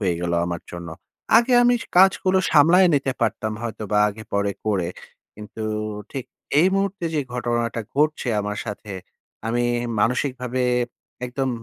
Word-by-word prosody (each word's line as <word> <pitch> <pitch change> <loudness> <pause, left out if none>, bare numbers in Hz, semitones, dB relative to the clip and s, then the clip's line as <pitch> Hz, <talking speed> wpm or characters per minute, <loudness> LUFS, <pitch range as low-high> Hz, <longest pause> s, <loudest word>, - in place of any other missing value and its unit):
হয়ে 90 -4 +1
গেল 85 0 -2
আমার 85 -2 -4
জন্য। 85 -1 -7 0.5
আগে 245 +2 +1
আমি 245 0 +5
স - - -9
কাজগুলো 190 0 +5
সামলায় 170 +5 +6
নিতে 135 -1 +1
পারতাম 110 0 0
হয়তোবা 110 -2 -2
আগে-পরে 100 -1 -2
করে, 95 -5 +1 0.5
কিন্তু 105 +1 -9 0.5
ঠিক 135 -3 -5 0.4
এই 180 - +5
মুহূর্তে 195 -2 -1
যে 150 - +2
ঘটনাটা 120 -1 -1 0.2
ঘটছে 150 -3 +1
আমার 105 0 -4
সাথে 105 0 -7 0.6
আমি 120 +1 0 0.4
মানসিকভাবে 125 +1 0 0.6
একদম 130 +2 -2
120 Hz, 135 wpm, -23 LUFS, 105-150 Hz, 0.6 s, সামলায়